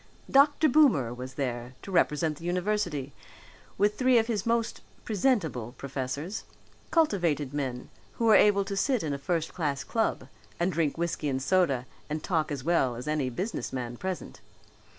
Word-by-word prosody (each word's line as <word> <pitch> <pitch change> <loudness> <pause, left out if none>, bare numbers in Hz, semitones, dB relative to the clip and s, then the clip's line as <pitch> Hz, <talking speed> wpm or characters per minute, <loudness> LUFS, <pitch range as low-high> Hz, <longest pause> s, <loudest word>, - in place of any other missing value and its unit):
Dr. 290 +3 +5
Boomer 240 - +4
was 125 +1 -8
there 125 -2 -3
to 195 - -7
represent 155 -3 +1
the - - -12
university 175 -6 -1 0.6
with 205 +1 +2
three 255 -1 +5
of 225 - +4
his 225 -3 -2
most 230 -1 0 0.2
presentable 180 - 0
professors, 140 +7 -4 0.5
cultivated 170 - +1
men 130 -4 -4 0.2
who 230 - -2
were 220 - +6
able 200 -1 +5
to 200 - -4
sit 250 +2 +1
in 150 -3 -1
a 140 - -4
first 165 +2 -1
class 145 -5 -2
club 225 -2 -1 0.3
and 175 +2 +1
drink 160 -3 0
whiskey 165 -3 -1
and 130 -1 -1
soda 140 -3 +2 0.2
and 150 +1 -3
talk 160 -5 0
as 140 -3 -4
well 145 -7 +2
as 125 +4 -7
any 150 -4 0
businessman 125 - -4
present. 185 +7 -5
165 Hz, 160 wpm, -28 LUFS, 135-205 Hz, 0.6 s, were